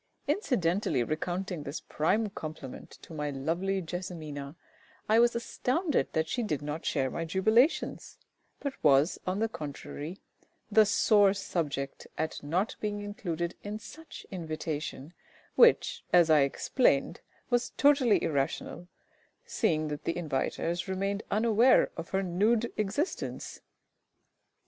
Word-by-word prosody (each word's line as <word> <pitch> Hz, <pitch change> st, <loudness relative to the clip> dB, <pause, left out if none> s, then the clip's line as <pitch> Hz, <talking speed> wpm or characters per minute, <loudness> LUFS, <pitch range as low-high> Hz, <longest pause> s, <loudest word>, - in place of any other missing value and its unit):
Incidentally 200 Hz, -, +1 dB
recounting 175 Hz, +4 st, -3 dB
this 145 Hz, +2 st, -5 dB
prime 210 Hz, +9 st, 0 dB
compliment 155 Hz, -7 st, -8 dB
to -, -, -11 dB
my 150 Hz, -1 st, -2 dB
lovely 170 Hz, +8 st, -1 dB
JESSIMINA, 160 Hz, -5 st, -6 dB, 0.5 s
I 220 Hz, +2 st, +5 dB
was 240 Hz, 0 st, +4 dB
astounded 275 Hz, +7 st, 0 dB
that 160 Hz, 0 st, +1 dB
she 245 Hz, -, -1 dB
did 155 Hz, -, -2 dB
not 150 Hz, +2 st, -4 dB
share 130 Hz, -1 st, 0 dB
my 165 Hz, -, -3 dB
jubilations, 220 Hz, -, +1 dB, 0.4 s
but 280 Hz, -2 st, -3 dB
was, 145 Hz, +2 st, +4 dB
on 185 Hz, +1 st, 0 dB
the 225 Hz, +2 st, +1 dB
contrary, 155 Hz, -1 st, -7 dB, 0.5 s
the 215 Hz, 0 st, +6 dB
sore 205 Hz, -2 st, +4 dB
subject 145 Hz, -8 st, -3 dB
at 160 Hz, 0 st, -2 dB
not 175 Hz, +9 st, -1 dB
being 205 Hz, -1 st, -2 dB
included 175 Hz, -5 st, -3 dB
in 205 Hz, +1 st, -5 dB
such 320 Hz, +8 st, -11 dB
invitation, 155 Hz, -3 st, -5 dB, 0.4 s
which, 475 Hz, 0 st, +4 dB
as 170 Hz, -2 st, +6 dB
I 155 Hz, -, +7 dB
explained, 140 Hz, -, +1 dB, 0.3 s
was 245 Hz, 0 st, +2 dB
totally 280 Hz, -6 st, +4 dB
irrational, 150 Hz, +4 st, -2 dB, 0.6 s
seeing 155 Hz, -1 st, 0 dB
that 150 Hz, 0 st, -6 dB
the 165 Hz, -, 0 dB
inviters 165 Hz, +3 st, -2 dB
remained 195 Hz, +2 st, -1 dB
unaware 230 Hz, +3 st, +4 dB
of 165 Hz, 0 st, -6 dB
her 195 Hz, 0 st, 0 dB
nude 215 Hz, +6 st, +1 dB
existence. 215 Hz, -, -3 dB
180 Hz, 125 wpm, -30 LUFS, 155-215 Hz, 0.6 s, I